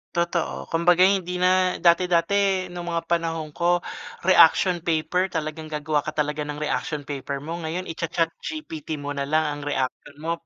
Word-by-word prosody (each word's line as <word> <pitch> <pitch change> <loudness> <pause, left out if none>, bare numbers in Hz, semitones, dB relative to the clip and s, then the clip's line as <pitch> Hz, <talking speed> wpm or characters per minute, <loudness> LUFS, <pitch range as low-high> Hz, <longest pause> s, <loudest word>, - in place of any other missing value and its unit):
Totoo, 170 0 -1
kumbaga 175 +2 +4
hindi 185 -2 +2
na 185 0 +3
dati-dati 180 +2 +3
nung 175 0 -6
mga 170 -1 -1
panahon 165 -2 -1
ko- 175 +2 +1 0.4
reaction 180 0 +5
paper- 170 +3 0
talagang 155 0 -3
gagawa 150 0 -1
ka 155 +1 -5
talaga 150 0 -1
ng 150 0 -5
reaction 150 0 -2
paper 140 0 -5
mo. 165 +2 -5
Ngayon 165 +2 -3
i-cha-ChatGPT 165 - -3
mo 145 - -3
na 140 -1 -3
lang 155 +2 +2
ang 145 -1 -3
reaksyon 130 -3 -3
mo. 165 - -1
165 Hz, 155 wpm, -24 LUFS, 150-180 Hz, 0.4 s, reaction